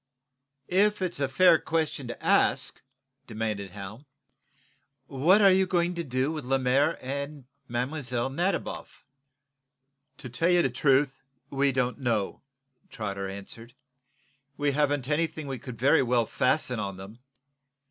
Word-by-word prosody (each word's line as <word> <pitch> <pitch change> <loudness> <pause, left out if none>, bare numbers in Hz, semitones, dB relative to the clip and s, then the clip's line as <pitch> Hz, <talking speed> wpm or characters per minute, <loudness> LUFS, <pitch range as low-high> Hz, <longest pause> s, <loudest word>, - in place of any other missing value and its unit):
"If 205 +3 +2
it's 180 -5 -2
a 140 - +1
fair 165 +4 +5
question 155 -5 -2
to 120 - -8
ask," - - +2 0.5
demanded 110 -3 -3
Hal, 105 +8 -9 1.0
"what 160 +11 +3
are 195 - +8
you 190 0 +3
going 175 -1 +1
to 170 -1 -3
do 130 0 -1
with 155 -2 -5
Lemaire 135 +4 +2
and 140 +1 -5 0.2
Mlle. 125 0 -2
Nadiboff?" 175 +5 -3 1.1
"To - - -9
tell 125 +9 0
you 175 -1 +4
the 135 - 0
truth, 135 +1 +2 0.3
we 140 0 +2
don't 125 0 -1
know," 115 -6 -1 0.5
Trotter 100 -4 -4
answered. 115 +5 -9 0.8
"We 145 0 +1
haven't 145 -2 0
anything 155 0 -1
we 135 -2 -5
could 120 0 -8
very 135 +5 +4
well 120 -2 +2
fasten 125 0 0
on 100 -2 -4
them. 100 +5 -11
135 Hz, 135 wpm, -27 LUFS, 120-155 Hz, 1.1 s, are